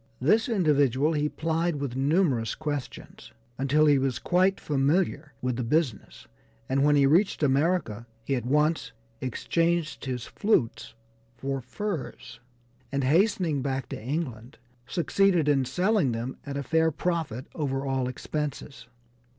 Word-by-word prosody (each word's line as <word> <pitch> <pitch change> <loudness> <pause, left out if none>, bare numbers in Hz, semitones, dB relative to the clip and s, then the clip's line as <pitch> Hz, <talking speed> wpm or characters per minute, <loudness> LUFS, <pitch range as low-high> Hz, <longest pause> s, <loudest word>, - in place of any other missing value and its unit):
This 215 - +3
individual 150 - +2
he 150 0 0
plied 165 +2 -1
with 140 -4 -4
numerous 135 - +1
questions, 145 -4 -6 0.3
until 145 +3 +3
he 145 -2 +5
was 130 -1 0
quite 185 +2 +2
familiar 145 +1 0
with 125 -2 -1
the 125 - -1
business, 115 - -1 0.4
and 135 +1 +1
when 145 0 +4
he 140 -1 +5
reached 165 +4 +3
America 140 - +1 0.2
he 135 - -2
at 125 - -2
once 150 +5 +1 0.3
exchanged 165 +6 -1
his 125 -2 -3
flutes 115 - 0 0.4
for 135 0 -3
furs, 130 - -5 0.5
and 140 0 -1
hastening 165 0 +2
back 135 -1 -2
to - - -6
England 130 -3 -4 0.3
succeeded 175 +1 +2
in 140 -3 +3
selling 185 - +1
them 120 +3 -4
at 140 0 -4
a 140 - -3
fair 160 +4 +2
profit 160 -7 -2
over 135 -3 -2
all 135 -2 0
expenses. 140 -3 -5
145 Hz, 135 wpm, -27 LUFS, 130-165 Hz, 0.5 s, he